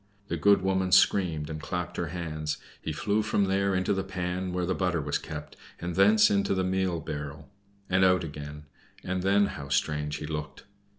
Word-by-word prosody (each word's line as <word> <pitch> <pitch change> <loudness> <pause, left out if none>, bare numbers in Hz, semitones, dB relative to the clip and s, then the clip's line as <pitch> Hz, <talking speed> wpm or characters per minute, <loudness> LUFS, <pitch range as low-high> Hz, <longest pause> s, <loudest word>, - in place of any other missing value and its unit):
The - - 0
good 100 -2 +4
woman 95 -1 +1
screamed 90 -4 +4
and 80 0 -6
clapped 90 +1 -4
her 85 - -1
hands. 75 -3 -3 0.2
He 80 - -3
flew 100 +7 0
from 105 -1 +1
there 95 0 +1
into 95 +2 +1
the 95 -1 -1
pan 90 -1 -3
where 90 0 -1
the 95 - 0
butter 90 -3 0
was 70 -1 -1
kept, 75 -1 -8 0.2
and 85 0 -4
thence 105 +4 +5
into 100 -1 +2
the 95 - +1
meal 95 -2 0
barrel, 75 +1 -6 0.4
and 95 +1 +3
out 90 -1 +4
again, 75 -1 -7 0.4
and 95 0 -2
then 100 +2 +4
how 70 -7 -6
strange 75 +1 0
he 75 - -5
looked! 75 -3 -5
90 Hz, 190 wpm, -28 LUFS, 75-95 Hz, 0.4 s, thence